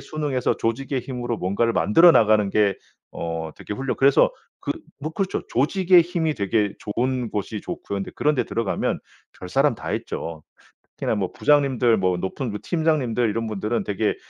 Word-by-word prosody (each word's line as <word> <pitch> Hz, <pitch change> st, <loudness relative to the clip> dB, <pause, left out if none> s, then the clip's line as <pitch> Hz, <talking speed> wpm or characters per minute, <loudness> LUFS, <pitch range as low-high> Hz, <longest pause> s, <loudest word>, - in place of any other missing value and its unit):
순응해서 145 Hz, -5 st, -1 dB
조직의 130 Hz, +4 st, -1 dB
힘으로 120 Hz, -3 st, -4 dB
뭔가를 100 Hz, +6 st, 0 dB
만들어 165 Hz, -, +6 dB
나가는 105 Hz, -2 st, +4 dB
게 100 Hz, -1 st, +3 dB, 0.4 s
어 80 Hz, -1 st, -4 dB
되게 -, -, -7 dB
훌륭 135 Hz, +2 st, -3 dB
그래서 135 Hz, 0 st, +5 dB, 0.3 s
그 -, -, -2 dB, 0.3 s
뭐 155 Hz, +3 st, -4 dB
그렇죠. 195 Hz, +2 st, -1 dB
조직의 180 Hz, +7 st, +4 dB
힘이 165 Hz, -3 st, -1 dB
되게 100 Hz, 0 st, 0 dB
좋은 125 Hz, +2 st, -2 dB
곳이 105 Hz, +1 st, -3 dB
좋고요. 130 Hz, -, -5 dB
근데 95 Hz, -, -5 dB
그런데 150 Hz, -2 st, +1 dB
들어가면 115 Hz, -4 st, -1 dB, 0.4 s
별사람 135 Hz, +9 st, +1 dB
다 -, -, -5 dB
있죠. 80 Hz, -1 st, -5 dB, 0.6 s
특히나 -, -, -1 dB
뭐 95 Hz, -3 st, -2 dB
부장님들 130 Hz, -6 st, +3 dB
뭐 90 Hz, -2 st, +1 dB
높은 105 Hz, +7 st, -3 dB
그 105 Hz, -, -5 dB
팀장님들 145 Hz, -9 st, +1 dB
이런 115 Hz, +2 st, -2 dB
분들은 110 Hz, +1 st, -2 dB
되게 105 Hz, +1 st, 0 dB
115 Hz, 355 characters per minute, -23 LUFS, 105-140 Hz, 0.6 s, 만들어